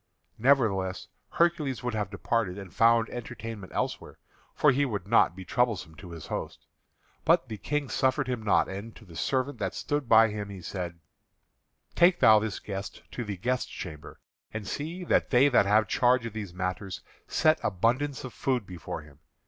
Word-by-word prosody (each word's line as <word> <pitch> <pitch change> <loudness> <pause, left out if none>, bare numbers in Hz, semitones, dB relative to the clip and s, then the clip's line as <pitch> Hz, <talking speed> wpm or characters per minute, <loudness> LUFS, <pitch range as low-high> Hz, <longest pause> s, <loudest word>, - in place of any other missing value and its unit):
Nevertheless 110 -8 +2 0.2
Hercules 155 -7 +1
would 125 -1 -2
have 105 -3 -2
departed 100 -1 -1
and 95 -3 -9
found 115 0 +4
entertainment 115 -4 -7
elsewhere, - - -3 0.4
for 150 - +5
he 140 +2 +2
would 105 -8 -3
not 105 -5 +4
be 95 0 -9
troublesome 115 -9 0
to 90 - -10
his 85 -3 -8
host. - - -5 0.6
But 165 -5 +3
the 110 -2 -6
King 150 +6 -1
suffered 130 +1 +1
him 125 -3 -2
not. 105 -2 +3
And 100 +4 -7
to 110 - -14
the 85 -4 -14
servant 130 - -1
that 95 -3 -2
stood 145 -4 -2
by 115 0 +7
he 100 -2 -6
said: 85 -3 -5 1.0
"Take 175 +1 +5
thou 110 -1 +7
this 105 -2 -3
guest 100 0 -6
to 120 - -4
the 105 -3 -5
guest 125 +6 -1
chamber; 75 -5 -8 0.3
and 110 -1 -5
see 165 +5 -4
that - - +2
they 135 +2 +5
that 120 -6 +4
have 105 +1 +4
charge 125 -1 +3
of 115 - -5
these 105 -4 -5
matters 90 +1 -4 0.3
set 155 0 +3
abundance 125 +8 0
of 130 - -7
food 130 -5 -1
before 90 -5 -7
him. 75 -1 -18
110 Hz, 175 wpm, -28 LUFS, 95-130 Hz, 1.0 s, by